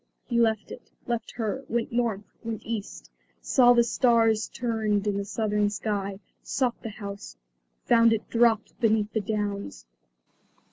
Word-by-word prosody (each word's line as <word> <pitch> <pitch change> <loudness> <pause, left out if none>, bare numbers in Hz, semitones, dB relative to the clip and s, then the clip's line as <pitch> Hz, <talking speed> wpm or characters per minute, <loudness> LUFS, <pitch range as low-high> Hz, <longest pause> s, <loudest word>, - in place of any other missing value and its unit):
He 235 -1 0
left 220 -2 +1
it, - - -10 0.2
left 235 -1 -2
her, 230 +3 -3
went 235 0 -1
North, 230 -4 0 0.2
went 225 -2 -5
East, 220 -3 -6 0.3
saw 245 -2 +5
the 235 -1 +5
stars 230 -3 +2
turned 220 -4 -1
in 205 -1 0
the 200 - -2
Southern 210 0 0
sky; 200 -2 -3 0.2
sought 250 -3 -1
the 225 - -5
house, 200 -1 -8 0.5
found 230 -1 +5
it 225 -1 -1
dropped 230 -2 +2
beneath 220 -2 +2
the 220 - 0
Downs. 200 - -3
220 Hz, 145 wpm, -26 LUFS, 205-235 Hz, 0.5 s, saw